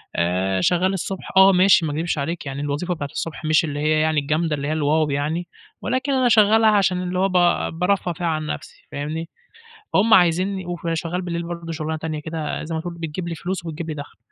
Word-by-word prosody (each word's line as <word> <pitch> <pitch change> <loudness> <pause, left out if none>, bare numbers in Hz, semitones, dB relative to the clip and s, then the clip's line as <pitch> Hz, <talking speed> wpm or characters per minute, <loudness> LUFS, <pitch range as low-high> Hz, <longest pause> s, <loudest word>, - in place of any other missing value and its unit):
آآ 95 +2 0
شغّال 180 - +2
الصبح 190 0 -5
آه، 190 0 +8
ماشي 185 -2 +5
ما 150 - -2
أكدبش 160 +1 -1
عليك 160 +3 -3
يعني 135 +1 -4
الوظيفة 145 +5 -2
بتاعة 145 -4 -4
الصبح 165 +1 -5
مش 155 +1 +4
اللي 145 -1 -4
هي 155 +1 +2
يعني 155 -1 +2
الجامدة 155 +2 0
اللي 140 0 -4
هي 155 - 0
الواو 155 0 +1
يعني 150 +5 -2 0.3
ولكن 260 +3 -1
أنا 255 -2 +3
شغّالها 220 0 +5
عشان 190 -3 +2
اللي 180 0 -2
هو 195 +1 +2
ب - - -6 0.5
بارفّه 180 -1 +1
فيها 170 +1 -3
عن 155 -1 -1
نَفْسي - - -7
فاهمني، 155 +3 -4 0.6
فهُم 215 +3 +4
عايزينّي 185 0 +3
وف 175 -1 -5
شغّال 170 +2 -2
بالليل 170 -1 -3
برضه 170 -1 -6
شُغلانة 160 0 -3
تانية 155 -1 -4
كده 160 -1 -4
زي 160 +1 -4
ما 160 - -2
تقول 175 0 -6
بتجيب 170 +1 -5
لي 170 - -3
فلوس، 180 +1 -4
وبتجيب 165 +1 -5
لي - - -2
دَخْل. 145 -1 -9
165 Hz, 215 wpm, -22 LUFS, 155-180 Hz, 0.6 s, آه